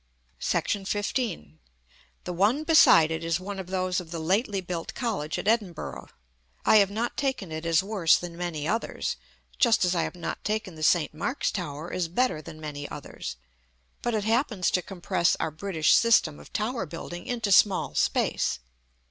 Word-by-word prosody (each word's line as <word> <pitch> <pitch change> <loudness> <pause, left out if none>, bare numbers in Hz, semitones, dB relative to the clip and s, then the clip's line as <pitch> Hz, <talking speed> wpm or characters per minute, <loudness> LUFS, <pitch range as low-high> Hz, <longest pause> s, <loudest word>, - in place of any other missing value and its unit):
§ 195 -2 -1
XV. 205 - -2 0.6
The 180 - -4
one 210 - +2
beside 310 - +6
it 160 0 -3
is 165 +1 0
one 195 +1 -6
of 190 - -6
those 185 0 -1
of 175 -3 -9
the 170 - -5
lately 195 +5 0
built 175 -2 -5
college 200 - -2
at - - -4
Edinburgh. 210 -7 -1 0.6
I 220 - +7
have 200 -2 +5
not 225 +4 -2
taken 265 - -2
it 160 +1 -4
as 165 +2 +3
worse 195 -5 +3
than 175 -1 -7
many 170 -4 -3
others 225 +5 -2 0.4
(just 230 -6 +4
as 180 - +1
I 170 - +1
have - - -3
not 175 - -5
taken 215 -3 -2
the 155 - -11
St. 155 0 +3
Mark's 165 - -1
tower 160 -3 -5
as 180 -2 -1
better 180 -2 0
than 155 0 -11
many 145 -2 -6
others); 145 - -7 0.7
but 240 -1 -1
it 210 - 0
happens 225 -3 +1
to 180 - +2
compress 175 -2 0
our 160 - -1
British 160 -1 +1
system 210 -10 +4
of - - -14
tower 220 -2 -2
building 175 +2 -7
into 230 -4 -1
small 190 - +4
space. - - +1
185 Hz, 175 wpm, -27 LUFS, 165-215 Hz, 0.7 s, I